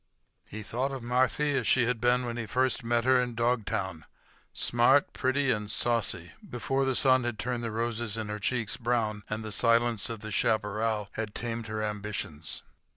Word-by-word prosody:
He 110 +1 -7
thought 125 +6 -2
of 135 -3 -5
Marthy 130 +4 +2
as 125 -5 0
she 125 -2 +4
had 120 -1 -1
been 125 +1 +3
when 120 -1 -3
he 115 -2 -4
first 130 +2 +1
met 120 0 +1
her 130 0 +5
in 125 -1 -3
Dogtown—smart, 115 - 0
pretty, 130 +1 +1
and 105 -3 -2
saucy—before 125 - -1
the 135 -1 +1
sun 130 -2 +4
had 120 -2 -2
turned 120 +2 -2
the 115 - -2
roses 115 -1 -2
in 110 -1 -3
her 105 0 -4
cheeks 115 0 -1
brown 115 -3 0
and 110 +1 -3
the 110 - -5
silence 115 0 +2
of 115 -2 -5
the 110 -1 -6
chaparral 105 0 0
had 110 -2 -5
tamed 115 -1 -3
her 110 0 -3
ambitions. 105 -7 -4
115 Hz, 175 wpm, -29 LUFS, 110-125 Hz, -, her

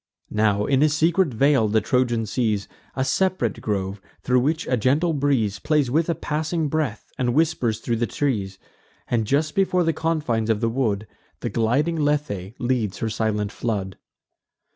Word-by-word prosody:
Now, 105 -1 +2
in 135 -1 +2
a 155 - +5
secret 160 +2 +2
vale, 130 -1 +3
the 110 +1 +3
Trojan 120 0 +1
sees 110 -3 -1 0.3
A 130 - 0
sep'rate 185 - 0
grove, 100 -1 -2 0.2
thro' 125 0 +3
which 155 +5 0
a 125 - +1
gentle 140 +9 +2
breeze 130 -9 +1
Plays 150 -5 +1
with 160 +4 +1
a 170 - +1
passing 155 +1 -2
breath, 145 -8 -2
and 120 -1 +1
whispers 145 -8 +1
thro' 120 - -1
the 115 +1 0
trees; 100 -10 -2 0.5
And, 115 -3 0
just 150 +4 +1
before 185 -2 +2
the 165 -1 +1
confines 150 -10 -1
of 110 -2 +2
the 115 0 +1
wood, 110 -4 -1 0.4
The - - -3
gliding 140 +9 +1
Lethe 120 -9 -1
leads 120 -5 -1
her 110 - -2
silent 105 -2 -1
flood. 100 -5 -3
125 Hz, 165 wpm, -23 LUFS, 110-150 Hz, 0.5 s, a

